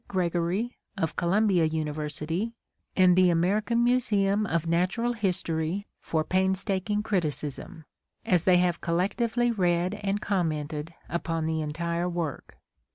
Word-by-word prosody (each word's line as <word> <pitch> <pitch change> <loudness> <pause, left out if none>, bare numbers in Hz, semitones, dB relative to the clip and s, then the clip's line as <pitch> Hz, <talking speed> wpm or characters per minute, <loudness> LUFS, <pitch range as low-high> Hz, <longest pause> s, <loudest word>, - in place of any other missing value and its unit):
Gregory 180 +5 -1 0.2
of 165 -4 -1
Columbia 185 0 +2
University 155 +6 -3 0.4
and 185 -2 +6
the 185 -1 +5
American 210 +8 +2
Museum 210 -4 +2
of 170 -2 0
Natural 185 +9 +1
History 180 -3 -1
for 160 -1 -1
painstaking 190 +3 0
criticism, 155 -5 -3 0.4
as 175 -3 +2
they 185 -1 +6
have 175 -1 +1
collectively 230 +8 +1
read 180 -3 +1
and 200 0 0
commented 155 -6 -2 0.2
upon 165 -2 -2
the 160 0 -1
entire 170 +3 -2
work. 170 -5 -4
180 Hz, 115 wpm, -27 LUFS, 165-200 Hz, 0.4 s, and